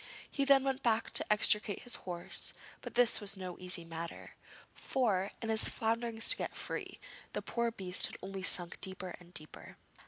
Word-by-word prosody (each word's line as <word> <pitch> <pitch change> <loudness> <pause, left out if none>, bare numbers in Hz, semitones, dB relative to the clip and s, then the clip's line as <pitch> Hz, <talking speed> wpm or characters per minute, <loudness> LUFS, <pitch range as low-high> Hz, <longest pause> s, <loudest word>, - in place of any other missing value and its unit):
He 275 - 0
then 275 -1 +6
went 270 0 -1
back 225 -2 +1
to - - +4
extricate 210 -1 +4
his 245 - -5 0.2
horse, 175 -1 -3 0.3
but - - -8
this 240 -2 +4
was 200 -1 -4
no 185 -2 -6
easy 180 -2 -2
matter, 165 0 -7 0.4
for, 205 -7 0
in 225 - -3
his 220 0 +6
flounderings 225 0 -1
to - - +7
get - - -4
free, - - -5 0.3
the - - -2
poor 235 -1 -1
beast 190 -5 0
had - - -10
only 195 0 -5
sunk 175 -1 0
deeper 190 -1 -2
and 175 -1 -17
deeper. 155 -3 -6
205 Hz, 180 wpm, -33 LUFS, 180-235 Hz, 0.4 s, to